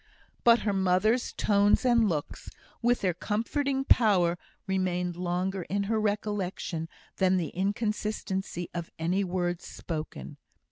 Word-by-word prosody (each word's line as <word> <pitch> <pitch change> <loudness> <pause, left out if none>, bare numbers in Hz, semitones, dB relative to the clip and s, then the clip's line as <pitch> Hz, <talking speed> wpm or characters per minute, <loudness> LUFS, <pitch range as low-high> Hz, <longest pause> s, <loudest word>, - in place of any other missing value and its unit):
But 235 0 +6
her 205 - 0
mother's 195 +5 +2
tones 205 +3 +3
and 235 -3 +4
looks, 150 -4 -4 0.3
with 240 +1 +2
their 185 -2 +1
comforting 265 - -1
power, 190 -10 +4 0.3
remained 180 -2 -1
longer 180 +2 -1
in 200 +1 0
her 220 +2 0
recollection 200 -5 -2 0.3
than 185 -1 +3
the 170 -4 -1
inconsistency 200 -2 -2
of 170 -1 -4
any 180 +5 +1
words 175 -1 -2
spoken. 155 - -6
190 Hz, 125 wpm, -28 LUFS, 175-215 Hz, 0.3 s, But